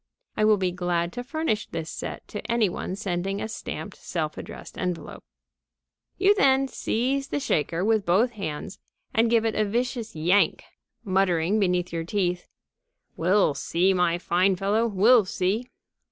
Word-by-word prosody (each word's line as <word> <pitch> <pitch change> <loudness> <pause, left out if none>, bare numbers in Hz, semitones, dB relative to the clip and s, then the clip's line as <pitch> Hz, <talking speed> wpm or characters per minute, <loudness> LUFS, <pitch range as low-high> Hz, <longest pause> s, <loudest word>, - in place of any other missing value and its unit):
I 215 - +2
will 215 -1 +5
be 185 -2 0
glad 175 -1 -1
to 245 - -5
furnish 250 -7 -2
this 160 -1 -5
set - - -6
to 210 - -5
any 230 -4 +3
one 180 +1 -4
sending 195 0 -2
a - - -3
stamped, 220 - -6
self - - -3
addressed - - -9
envelope.) 180 -2 -4 0.9
You 390 +2 +5
then 270 -7 +3
seize 265 +3 -1
the 290 - -2
shaker 165 - 0
with 220 -2 +2
both 200 +7 +3
hands 195 -3 -6 0.3
and 225 +1 +3
give 230 -1 +3
it 225 - +1
a 215 - +1
vicious 235 0 -2
yank, 175 +6 +2 0.4
muttering 190 0 +2
between 180 -3 +2
your 165 -1 -2
teeth: 180 0 -1 0.7
"We'll 185 -1 +3
see, 180 +6 +1
my 175 -2 +2
fine 185 +2 +2
fellow! 205 +5 +1
We'll 220 +2 +5
see!" 195 +6 -1
195 Hz, 155 wpm, -25 LUFS, 180-225 Hz, 0.9 s, will